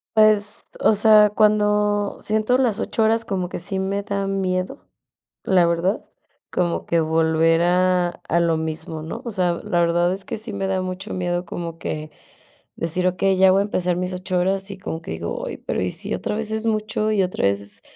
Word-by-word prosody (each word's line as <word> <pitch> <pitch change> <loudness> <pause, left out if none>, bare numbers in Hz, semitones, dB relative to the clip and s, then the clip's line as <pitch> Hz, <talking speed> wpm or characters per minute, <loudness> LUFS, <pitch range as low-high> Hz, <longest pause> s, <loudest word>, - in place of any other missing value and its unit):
Pues, 215 -1 +3
o - - +4
sea, 210 0 +6
cuando 210 -1 +2
siento 215 +3 +1
las 235 -5 +1
8 225 - 0
horas, 225 +1 +2
como 185 -5 -3
que - - -5
sí 190 +2 -4
me 195 +1 -1
da 200 -1 -2
miedo, 185 -1 -2 0.6
la 185 -3 +4
verdad, 170 +5 0 0.5
como 175 -2 -1
que 170 - +1
volver 160 +1 +2
a 180 0 +3 0.2
a 170 - +3
lo 170 -1 +2
mismo, 160 0 -4
¿no? 160 - -6
O 235 - -3
sea, 180 -4 +1
la 190 -5 0
verdad 175 +1 +2
es 195 +1 -6
que - - -5
sí 220 0 -6
me 195 -1 -2
da 190 -1 0
mucho 185 +3 -5
miedo 175 -1 -1
como 170 -1 -6
que 155 -1 -5 0.7
decir: 175 +2 -1
"Okey, 185 +1 +1
ya 190 0 +6
voy 190 - +4
a - - +2
empezar 180 -3 -1
mis 180 +1 -2
8 180 0 -2
horas". 190 +2 0
Y 200 - -7
como 185 -4 -5
que - - -8
digo: - - -4
"Ay, - - -5
pero, - - -3
¿y - - -1
si - - -5
otra - - -2
vez 220 0 -3
es 220 +1 -2
mucho, 215 -1 0
y 205 -3 +2
otra 180 - -3
vez 100 0 +2
es?". 100 0 -10
190 Hz, 205 wpm, -22 LUFS, 175-210 Hz, 0.7 s, sea